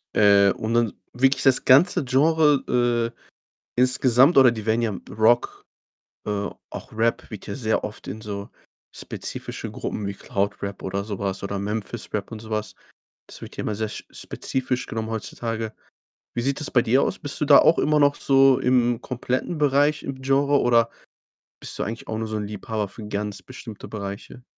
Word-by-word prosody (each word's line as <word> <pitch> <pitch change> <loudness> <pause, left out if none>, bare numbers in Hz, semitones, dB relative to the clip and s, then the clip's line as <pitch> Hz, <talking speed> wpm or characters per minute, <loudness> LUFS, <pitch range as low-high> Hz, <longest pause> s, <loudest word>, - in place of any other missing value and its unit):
Äh, 100 -1 +6
und 110 +3 -3
dann 115 -2 +2 0.2
wirklich 135 +2 +2
das 135 -2 +3
ganze 165 +6 +5
Genre, 130 -4 +2
äh, - - -36 0.6
insgesamt 125 +3 +5
oder 130 -2 +8
die 110 -2 -6
werden 110 +2 +2
ja 110 -4 -1
Rock, 110 +4 +2 0.7
äh 100 -1 -1 0.2
auch - - -9
Rap 115 +1 0
wird 105 -4 -9
ja - - -4
sehr 110 -5 0
oft 105 - -7
in 110 - -6
so 100 -2 -6 0.4
spezifische - - -5
Gruppen 105 - -4
wie 100 - -3
Cloud 100 +1 -3
Rap 100 0 -5
oder 100 +1 -2
so 100 -2 -6
was 95 -1 -3
oder 100 0 -3
Memphis 105 +3 -4
Rap 105 +1 -3
und 110 - -6
so 110 - -11
was. 110 -1 -3 0.5
Das - - -11
wird - - -9
ja - - -3
immer 105 - -2
sehr 110 +1 -2
spezifisch 130 +4 -4
genommen 110 0 -4
heutzutage. 115 0 -4 0.6
Wie 120 - -2
sieht 140 +3 0
das 150 - -1
bei 120 - +4
dir 125 +3 +3
aus? - - -2
Bist 145 - -3
du - - +2
da 140 -1 +8
auch 165 - +5
immer 150 0 +2
noch 145 0 +4
so 135 -2 +4
im 120 -2 +2
kompletten 130 +6 -3
Bereich 145 0 +2
im 135 -1 -6
Genre 140 +1 +2
oder 115 -1 +3 0.7
bist - - -2
du - - -1
eigentlich 115 +2 -6
auch 110 - -3
nur 110 0 -3
so 110 0 -3
'n 105 -1 -4
Liebhaber 105 0 -4
für 105 +3 -9
ganz 105 -1 -4
bestimmte 115 -3 -10
Bereiche? 100 +4 -7
115 Hz, 185 wpm, -24 LUFS, 105-130 Hz, 0.7 s, oder